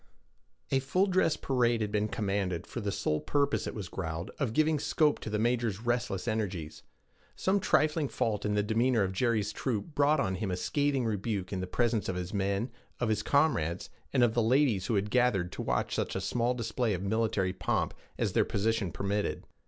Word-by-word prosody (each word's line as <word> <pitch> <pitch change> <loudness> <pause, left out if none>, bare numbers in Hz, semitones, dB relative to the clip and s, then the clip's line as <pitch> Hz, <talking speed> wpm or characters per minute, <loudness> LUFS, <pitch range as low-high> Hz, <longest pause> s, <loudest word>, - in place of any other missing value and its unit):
A 135 - +4
full 180 +9 +2
dress 185 -4 +2
parade 120 -3 +1
had 105 -1 -1
been 105 0 +1
commanded, 100 -5 -2
for 120 - -6
the 100 -1 -1
sole 75 -5 0
purpose, 145 -1 0
it - - -5
was 100 -4 -5
growled, 85 0 -4
of 135 -6 0
giving 155 +4 +2
scope 150 +1 +2
to - - -6
the 105 - -1
major's 115 -2 0
restless 120 -4 -1
energies. 95 -8 -3 0.5
Some 195 +2 +1
trifling 155 -4 +2
fault 105 -5 -1
in 105 0 0
the 105 - +2
demeanor 115 +1 +2
of 95 -1 -2
Jerry's 110 -1 +1
troop 130 +7 -3
brought 145 +1 +3
on 95 -6 0
him 105 -1 -2
a 90 - -1
scathing 140 +6 0
rebuke 105 -3 -2
in 95 - -1
the 95 - -3
presence 115 0 0
of 95 - -1
his 90 +2 -4
men, 100 +4 0 0.3
of 120 - 0
his 105 -1 +1
comrades, 95 - +1 0.2
and 130 -3 +3
of 115 -2 +3
the 120 - +2
ladies 120 -4 +3
who 115 - +1
had 100 +1 0
gathered 120 -8 +2
to - - -5
watch - - -1
such - - -1
small 120 +1 0
display 115 -2 -1
of 90 - -5
military 105 -3 0
pomp - - -1 0.2
as - - 0
their - - +4
position 105 -2 0
permitted. 100 +4 -2
110 Hz, 200 wpm, -30 LUFS, 100-125 Hz, 0.5 s, A